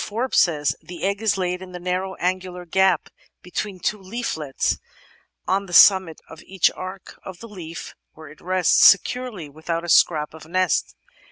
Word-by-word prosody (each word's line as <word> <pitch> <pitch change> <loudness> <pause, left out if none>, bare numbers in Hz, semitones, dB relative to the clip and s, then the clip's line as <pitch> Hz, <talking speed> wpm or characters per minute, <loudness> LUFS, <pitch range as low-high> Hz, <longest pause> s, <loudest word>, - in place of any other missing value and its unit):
Forbes 235 +4 0
says, 150 -4 +2
"The 175 -2 -10
egg 200 +2 -1
is 220 -3 +1
laid 180 -1 -2
in 185 -1 -10
the 180 - -7
narrow 185 +1 -3
angular 180 0 -3
gap 190 -1 +2 0.3
between 185 +2 -5
two 210 +3 -2
leaflets 185 - -3 0.7
on 195 +1 0
the 175 - -10
summit 190 -4 +6
of 160 - -12
the 190 0 -13 0.2
arch 185 0 -8
of 190 -2 -9
the 230 - -10
leaf, 170 -6 -9 0.2
where 155 0 -13
it 150 - -16
rests 185 -1 +3
securely, 215 -4 +3
without 165 +3 -5
a - - -6
scrap 155 -3 +3
of 160 -1 -13
nest 185 0 0
185 Hz, 170 wpm, -22 LUFS, 165-190 Hz, 0.7 s, summit